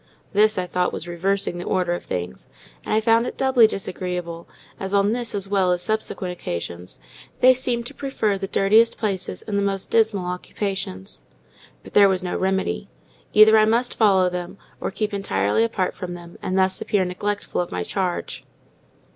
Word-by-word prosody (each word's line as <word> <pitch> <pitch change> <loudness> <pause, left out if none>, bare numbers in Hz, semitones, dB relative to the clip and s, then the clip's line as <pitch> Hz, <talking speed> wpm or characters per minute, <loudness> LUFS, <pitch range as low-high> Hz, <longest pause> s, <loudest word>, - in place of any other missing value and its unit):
This, 215 +1 +4
I 185 - 0
thought, 180 0 0
was 170 - -6
reversing 175 +1 -1
the - - -4
order 180 -2 0
of 175 - -4
things; 90 -7 -5 0.4
and - - -6
I 215 - +4
found 230 +2 +3
it - - -6
doubly 260 -4 +5
disagreeable, 180 -4 -4 0.3
as 195 +1 -2
on 200 +2 +3
this 240 -2 -2
as 200 -1 -3
well 195 -2 +2
as 180 0 0
subsequent 215 -3 -1
occasions, 85 - -6 0.4
they 255 +1 +7
seemed 245 -2 -1
to 275 - -8
prefer 265 -8 -1
the 195 0 -4
dirtiest 215 +5 +3
places 195 -4 -3
and 205 -2 -2
the - - +1
most 195 -1 -2
dismal 220 -5 +2
occupations. 190 +2 -5 0.6
But - - -13
there 200 -1 +7
was 185 -1 0
no 180 - -3
remedy; 190 - -1 0.4
either 215 +1 +7
I 215 - +5
must 235 +3 +1
follow 195 -4 +4
them, 180 +1 -5 0.2
or - - -2
keep 210 +2 -3
entirely 100 - +1
apart 210 -5 -1
from 180 -2 -6
them, 170 0 -12
and 185 - -2
thus 190 0 +1
appear 195 -3 +1
neglectful 200 +2 -2
of 175 - -5
my 90 - -2
charge. 180 - -3
195 Hz, 180 wpm, -23 LUFS, 180-215 Hz, 0.6 s, they